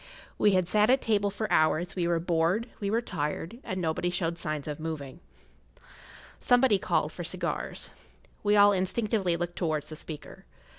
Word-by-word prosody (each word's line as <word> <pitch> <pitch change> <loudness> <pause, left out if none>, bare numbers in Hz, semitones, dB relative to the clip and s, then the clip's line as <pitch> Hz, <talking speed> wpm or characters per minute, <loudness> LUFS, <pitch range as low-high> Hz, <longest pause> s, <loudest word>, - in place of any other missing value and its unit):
[Pg - - -17
6] - - -31
We 210 - +5
had 185 -2 +2
sat 210 +3 +3
at 265 +2 +5
table 205 -4 +1
for 205 +2 -3
hours; 155 +2 +2
we 175 -2 0
were 170 -1 +1
bored, 170 +6 +1
we 200 - -2
were 230 +3 +1
tired, 165 +6 -4
and 185 - -4
nobody 170 +1 0
showed 170 -1 -2
signs 155 -2 -3
of 150 0 -4
moving. 155 -4 -5 1.2
Somebody 245 -4 +4
called - - 0
for - - -6
cigars. - - -3 0.5
We 205 0 +3
all 205 0 +7
instinctively 190 -1 +1
looked 175 0 -4
towards 155 -4 -1
the 155 - -6
speaker. 155 -1 -8
180 Hz, 180 wpm, -28 LUFS, 160-210 Hz, 1.2 s, all